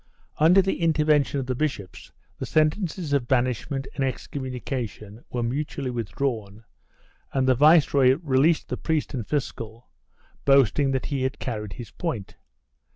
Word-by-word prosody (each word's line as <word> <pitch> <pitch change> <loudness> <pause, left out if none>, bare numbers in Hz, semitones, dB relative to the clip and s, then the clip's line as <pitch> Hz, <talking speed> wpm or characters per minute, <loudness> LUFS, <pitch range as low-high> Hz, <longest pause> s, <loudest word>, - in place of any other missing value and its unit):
Under 175 +5 +6
the 190 -1 -2
intervention 150 -3 +2
of 130 - -3
the 130 - -1
bishops 125 - -4 0.3
the - - -4
sentences 155 0 0
of 135 -4 +1
banish 125 -3 0
ment 135 -1 -3
and 135 - -2
excommunication 125 -5 -5
were 120 -1 -2
mutually 135 +1 -2
withdrawn, 110 -1 -3 0.7
and 130 -1 +1
the 130 - +6
viceroy 140 -2 +5
released 150 +3 +2
the - - -2
priest 160 -2 -1
and 120 -6 -4
fiscal, 115 -5 -4 0.5
boasting 135 0 +4
that 130 -1 -1
he 140 -2 -2
had 130 0 -2
car 115 -4 -3
ried 105 -2 -7
his 120 -4 -9
point. 120 - -4
135 Hz, 150 wpm, -25 LUFS, 120-150 Hz, 0.7 s, Under